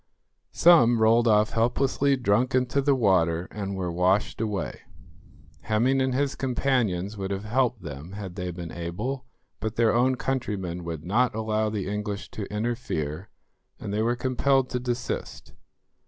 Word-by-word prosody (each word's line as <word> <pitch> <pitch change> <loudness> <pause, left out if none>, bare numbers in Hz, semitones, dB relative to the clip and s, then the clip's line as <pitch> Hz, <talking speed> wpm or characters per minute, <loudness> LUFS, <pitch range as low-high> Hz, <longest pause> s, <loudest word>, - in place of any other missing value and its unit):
Some 120 -9 +6
rolled 115 +2 +4
off 105 -1 +4
helplessly 135 +4 +2
drunk 125 +1 +1
into 130 +2 +1
the 140 0 +3
water, 90 -7 +2
and 100 -2 -4
were 90 -2 -2
washed 95 +5 +1
away. 105 -3 -3 0.8
Hemming 125 +5 +2
and 130 -1 0
his 140 0 +1
companions 120 -7 0
would 95 -1 -3
have 100 0 -3
helped 120 0 0
them 75 +3 -8
had 100 -3 -6
they 90 -1 -4
been 85 -1 -7
able, 105 +11 -4 0.3
but 110 +2 -3
their 115 -1 +3
own 125 +2 +3
countrymen 105 -10 -3
would 80 -2 -5
not 115 +6 +1
allow 110 -1 0
the 105 -3 -3
English 105 0 -4
to 100 - -6
interfere, 105 -7 -3 0.5
and 100 - -5
they 105 - 0
were 120 +2 +1
compelled 130 +1 +1
to 125 - -1
desist. 125 0 -4
110 Hz, 155 wpm, -26 LUFS, 95-125 Hz, 0.8 s, Some